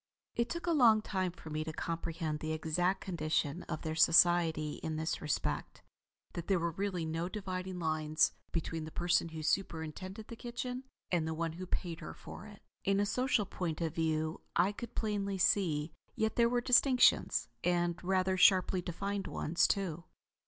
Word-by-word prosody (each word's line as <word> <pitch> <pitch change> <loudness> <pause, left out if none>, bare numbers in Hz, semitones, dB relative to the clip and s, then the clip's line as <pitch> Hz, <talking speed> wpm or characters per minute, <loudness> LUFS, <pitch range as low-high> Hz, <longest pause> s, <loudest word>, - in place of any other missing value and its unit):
It 235 - 0
took 340 0 -4
a 345 - +1
long 230 -8 +5
time 185 -4 -1
for 160 -2 -11
me 155 +1 -1
to 160 - -4
comprehend 165 -1 -3
the 155 +1 -3
exact 175 +4 0
condition 160 -2 -1
of 155 -2 -4
their 160 -1 -2
society 165 -2 +4
in 160 -1 -3
this 160 +1 -2
respect. 150 - -2 0.5
That 170 - -5
there 195 - +3
were 170 0 -1
really 185 -1 -2
no 165 +2 -2
dividing 185 -2 -4
lines 155 -2 +2 0.2
between 165 -1 -3
the - - -6
person 170 0 +1
who 160 -1 -6
superintended 185 +4 -2
the 230 - -8
kitchen 250 +2 -5 0.3
and 170 -3 +1
the 160 - -2
one 165 0 -2
who 185 +2 -7
paid 170 -2 -3
her - - -8
for 215 - -10
it, 205 -1 -14 0.2
in 195 0 +2
a 205 - +3
social 250 0 +1
point 175 -4 -3
of 165 -2 -1
view, 160 -1 -1
I 180 +4 +4
could 235 +3 -8
plainly 200 -3 -1
see; 165 -5 +2 0.2
yet 220 0 0
there 235 -1 +4
were 245 0 +1
distinctions; 250 +1 +4 0.2
and 175 0 +1
rather 185 0 +1
sharply 185 0 +5
defined 195 +3 -3
ones 165 +2 +1
too. 175 -4 -2
175 Hz, 175 wpm, -33 LUFS, 160-200 Hz, 0.5 s, long